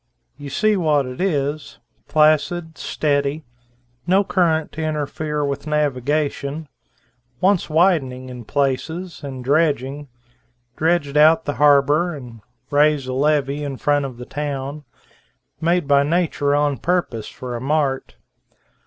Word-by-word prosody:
You 145 Hz, +1 st, -9 dB
see 215 Hz, +10 st, +2 dB
what 155 Hz, -6 st, +2 dB
it 125 Hz, +5 st, -6 dB
is, 145 Hz, -5 st, -1 dB, 0.3 s
placid, 155 Hz, +2 st, +2 dB
steady, 145 Hz, +1 st, -1 dB, 0.6 s
no 190 Hz, +3 st, +4 dB
current 175 Hz, -4 st, +1 dB
to 160 Hz, -, -6 dB
interfere 150 Hz, -1 st, -2 dB
with 140 Hz, +1 st, -4 dB
navigation, 150 Hz, +1 st, -1 dB, 0.7 s
wants 190 Hz, -2 st, +2 dB
widening 155 Hz, -7 st, +2 dB
in 125 Hz, -2 st, -9 dB
places 150 Hz, -, -2 dB
and 130 Hz, -3 st, -6 dB
dredging, 145 Hz, -1 st, 0 dB, 0.7 s
dredge 160 Hz, -3 st, 0 dB
out 160 Hz, +2 st, +5 dB
the 145 Hz, -, -1 dB
harbor 150 Hz, +4 st, +4 dB
and 120 Hz, -5 st, -11 dB, 0.3 s
raise 145 Hz, -1 st, +3 dB
a 130 Hz, -, -4 dB
levee 145 Hz, +1 st, +1 dB
in 140 Hz, -2 st, -4 dB
front 145 Hz, 0 st, +1 dB
of 130 Hz, -3 st, -7 dB
the 125 Hz, -, -8 dB
town; 145 Hz, +1 st, -5 dB, 0.7 s
made 170 Hz, -1 st, +1 dB
by 140 Hz, -1 st, +5 dB
nature 150 Hz, -2 st, +1 dB
on 145 Hz, -1 st, +1 dB
purpose 170 Hz, -11 st, -1 dB
for 130 Hz, -3 st, -7 dB
a 120 Hz, -, -5 dB
mart. 135 Hz, -, -1 dB
145 Hz, 125 wpm, -21 LUFS, 140-160 Hz, 0.7 s, out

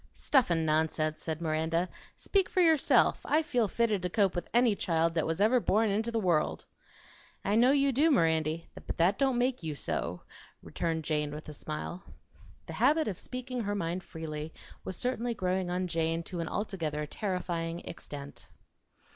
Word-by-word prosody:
"Stuff 265 Hz, -8 st, +2 dB
an' 165 Hz, -2 st, +1 dB
nonsense!" 155 Hz, 0 st, 0 dB
said 160 Hz, 0 st, -4 dB
Miranda 160 Hz, +2 st, 0 dB, 0.3 s
"Speak 390 Hz, -2 st, +1 dB
for -, -, 0 dB
yourself. 325 Hz, -4 st, +4 dB
I 310 Hz, +2 st, +2 dB
feel 250 Hz, -7 st, +1 dB
fitted 215 Hz, -2 st, +1 dB
to 180 Hz, -, -2 dB
cope 195 Hz, 0 st, +2 dB
with 175 Hz, -, -4 dB
any 240 Hz, -3 st, +4 dB
child 165 Hz, -3 st, +1 dB
that 160 Hz, -1 st, 0 dB
ever 225 Hz, +5 st, +4 dB
was -, -, -11 dB
born 215 Hz, +1 st, +3 dB
int' 220 Hz, +3 st, 0 dB
the 230 Hz, -, 0 dB
world!" 175 Hz, -7 st, +1 dB, 0.8 s
"I 200 Hz, -, +1 dB
know 235 Hz, +4 st, +5 dB
you 275 Hz, 0 st, +4 dB
do, 290 Hz, +6 st, +3 dB
Mirandy; 160 Hz, -, +2 dB
but -, -, -7 dB
that 180 Hz, +6 st, +3 dB
don't 265 Hz, -3 st, +2 dB
MAKE 250 Hz, -1 st, +1 dB
you 155 Hz, -3 st, -4 dB
so," 90 Hz, -9 st, -3 dB, 0.4 s
returned 165 Hz, -1 st, -2 dB
Jane 150 Hz, -1 st, 0 dB
with 150 Hz, +2 st, -8 dB
a -, -, -7 dB
smile. 155 Hz, +4 st, -5 dB, 0.6 s
The -, -, -7 dB
habit 310 Hz, +1 st, +3 dB
of 190 Hz, -, -3 dB
speaking 255 Hz, -1 st, -5 dB
her 205 Hz, -1 st, -2 dB
mind 180 Hz, -1 st, -2 dB
freely 155 Hz, -1 st, -6 dB, 0.3 s
was 185 Hz, -, -5 dB
certainly 245 Hz, -1 st, -1 dB
growing 185 Hz, -1 st, -1 dB
on 180 Hz, +1 st, -1 dB
Jane 165 Hz, -1 st, -1 dB
to 175 Hz, 0 st, -5 dB
an 165 Hz, -, -2 dB
altogether 160 Hz, -8 st, -3 dB
terrifying 175 Hz, -2 st, -3 dB
extent. 145 Hz, -3 st, -9 dB
180 Hz, 175 wpm, -30 LUFS, 160-235 Hz, 0.8 s, know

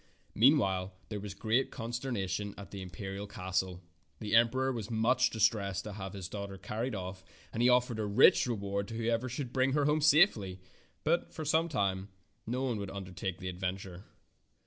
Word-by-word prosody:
Meanwhile 100 Hz, -7 st, +3 dB, 0.2 s
there 105 Hz, -2 st, -4 dB
was 100 Hz, -1 st, -7 dB
great 120 Hz, +5 st, +1 dB
consternation 110 Hz, -5 st, -3 dB
at 100 Hz, -, -10 dB
the 100 Hz, -, -6 dB
imperial 95 Hz, +2 st, -6 dB
castle. 95 Hz, -1 st, -2 dB, 0.4 s
The 105 Hz, -1 st, -4 dB
emperor 130 Hz, +3 st, +4 dB
was 115 Hz, -5 st, -4 dB
much 120 Hz, +3 st, +3 dB
distressed 105 Hz, -4 st, +1 dB
to 105 Hz, -, -6 dB
have 95 Hz, -2 st, -6 dB
his 95 Hz, -3 st, -5 dB
daughter 100 Hz, -1 st, -6 dB
car 105 Hz, +4 st, -5 dB
ried 125 Hz, -1 st, -1 dB
off, 95 Hz, 0 st, -6 dB, 0.3 s
and 115 Hz, -, -1 dB
he 125 Hz, -, +5 dB
offered 125 Hz, -2 st, +3 dB
a 110 Hz, -, 0 dB
rich 100 Hz, +4 st, +6 dB
reward 100 Hz, -3 st, -2 dB
to 115 Hz, -, -6 dB
who 115 Hz, 0 st, -3 dB
ever 120 Hz, +2 st, 0 dB
should 125 Hz, 0 st, -5 dB
bring 130 Hz, 0 st, +2 dB
her 145 Hz, -1 st, +2 dB, 0.2 s
safely 145 Hz, -, +4 dB
home, -, -, -18 dB, 0.4 s
but 170 Hz, +3 st, +1 dB
for 155 Hz, -, -6 dB
some 160 Hz, +3 st, +2 dB
time 100 Hz, -7 st, -1 dB, 0.4 s
no 125 Hz, +3 st, -1 dB
one 125 Hz, -4 st, 0 dB
would 100 Hz, -1 st, -4 dB
undertake 95 Hz, -1 st, -5 dB
the 95 Hz, -, -6 dB
ad 90 Hz, 0 st, -7 dB
venture. 95 Hz, 0 st, -4 dB
105 Hz, 190 wpm, -32 LUFS, 95-125 Hz, 0.4 s, rich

